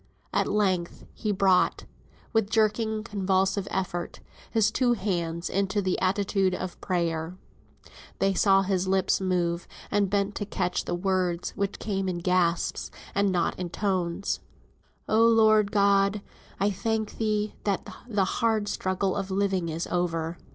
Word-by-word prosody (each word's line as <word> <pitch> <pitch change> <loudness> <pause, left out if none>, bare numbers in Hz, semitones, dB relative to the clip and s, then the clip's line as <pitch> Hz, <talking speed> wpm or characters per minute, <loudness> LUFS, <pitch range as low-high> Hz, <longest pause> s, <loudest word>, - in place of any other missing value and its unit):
At - - +2
length 190 -4 0
he 215 - -2
brought 190 -2 +2 0.5
(with 225 -3 +2
jerking, 220 0 +1
convulsive 195 -1 0
effort) 175 -2 -3 0.3
his 215 -1 +2
two 245 +1 +2
hands 170 -6 -2
into 195 +1 0
the 185 -2 0
attitude 195 0 +1
of 185 -1 -6
prayer. 170 -1 -1 0.8
They 195 0 +2
saw 195 0 +4
his 190 -1 0
lips 190 0 +2
move, 175 -2 0 0.2
and 205 -2 +2
bent 200 0 0
to 205 - -3
catch 180 -3 -1
the - - -1
words, 180 -1 0
which 200 0 -2
came 195 -3 -2
in 180 - -2
gasps, 175 -1 0 0.2
and 200 0 +2
not 175 -1 0
in 180 -1 -3
tones. 185 -1 -1 0.7
"Oh 220 +1 +4
Lord 215 -2 +5
God! 200 0 +3 0.4
I 200 +1 +2
thank 220 +2 -2
thee, 215 -1 0
that 200 -2 -1 0.2
the 205 -4 +2
hard 220 +1 0
struggle 185 0 -1
of 195 -1 -3
living 190 -3 0
is 160 +2 -3
over." 165 -1 -2
195 Hz, 145 wpm, -27 LUFS, 180-205 Hz, 0.8 s, Lord